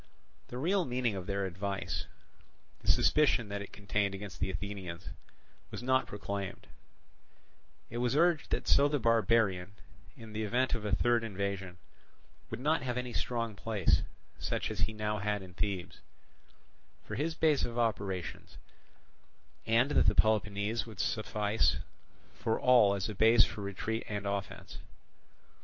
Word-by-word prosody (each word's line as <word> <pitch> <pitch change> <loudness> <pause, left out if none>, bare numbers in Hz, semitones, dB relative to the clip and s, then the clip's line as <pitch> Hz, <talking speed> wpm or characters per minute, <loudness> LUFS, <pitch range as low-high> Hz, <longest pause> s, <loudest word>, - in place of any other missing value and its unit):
The 125 - -7
real 180 +8 +2
meaning 125 -5 0
of 95 -2 -5
their 100 -1 -1
advice, 95 +2 -3 0.7
the - - -13
suspicion 135 -7 +4
that 100 0 -3
it 100 - -8
contained 100 -1 -1
against 100 0 -8
the 95 - 0
Athenians, 95 -2 -6 0.6
was - - -7
not 130 +1 +2
proclaimed; 100 -1 -5 1.3
it 120 - -3
was 125 +1 +1
urged 170 0 +3
that - - -2
so 140 +1 +6
the 145 0 +1
barbarian, 110 -5 +2 0.4
in 110 -2 -10
the 110 - -2
event 125 +4 +1
of 115 -3 -2
a 105 - -1
third 120 0 +2
invasion, 100 -3 -3 0.7
would - - -5
not 155 +5 +2
have 125 -1 -2
any 125 -1 -3
strong 115 -2 -1
place, 105 -2 +1 0.4
such - - -2
as 105 - -5
he 95 - +1
now 105 0 -2
had 105 0 -1
in 90 -1 -12
Thebes, 95 -3 -3 1.1
for - - -7
his 155 +8 -1
base 155 -4 +3
of 120 0 -3
operations; 100 -6 -2 1.1
and 120 +5 +3
that - - +3
Peloponnese 105 +1 +2
would 110 - -11
suffice 110 -1 +1 0.6
for 110 - -1
all 120 -6 +6
as 100 0 -2
a 105 - -4
base 110 +2 +6
both - - -2
for 105 - -7
retreat 100 +3 -3
and 105 -1 -3
offence. 100 -1 -4
105 Hz, 150 wpm, -32 LUFS, 100-120 Hz, 1.3 s, so